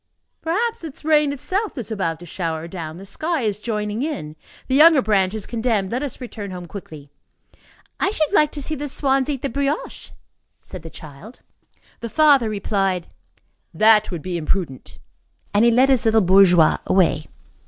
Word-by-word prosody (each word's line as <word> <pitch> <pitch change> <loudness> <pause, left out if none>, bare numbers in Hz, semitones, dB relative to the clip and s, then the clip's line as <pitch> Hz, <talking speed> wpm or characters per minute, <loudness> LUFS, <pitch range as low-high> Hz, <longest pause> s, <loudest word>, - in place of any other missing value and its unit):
"Perhaps 445 +6 -1
it 315 -4 -7
is - - -10
rain 300 -2 +3
itself 370 +10 -2
that 255 - -3
is 225 0 -11
about 170 -6 -2
to - - -9
shower 165 -2 -4
down; 165 -2 -7
the 195 - -10
sky 310 - -2
is 210 -3 -1
joining 210 0 -3
in; 265 - -4 0.3
the 260 - -2
younger 310 +2 +7
branch 200 -4 +1
is 215 - -4
condemned. 225 -5 -1
Let 250 +3 -1
us 285 -4 -5
return 225 -5 -7
home 180 -1 -7
quickly." 155 -6 -10 0.9
"I 385 - +2
should 315 -6 -1
like 300 -6 +4
to 290 - -5
see 315 - -3
the 290 -1 -4
swans 270 0 0
eat 275 -3 -3
the - - +1
brioche," 280 +4 -3 0.5
said 185 - -8
the 165 - -9
child. 155 - -12 0.6
The 230 - -6
father 280 -3 +4
replied: 195 -3 -1 0.7
"That 215 0 +5
would 170 -5 -6
be 180 -2 -3
imprudent." 155 -4 -3 0.6
And 205 +2 +4
he 235 - +6
led 255 +4 +4
his 260 -4 +4
little 225 0 +4
bourgeois 180 -3 +5
away. 185 -2 +2
220 Hz, 180 wpm, -21 LUFS, 185-280 Hz, 0.9 s, younger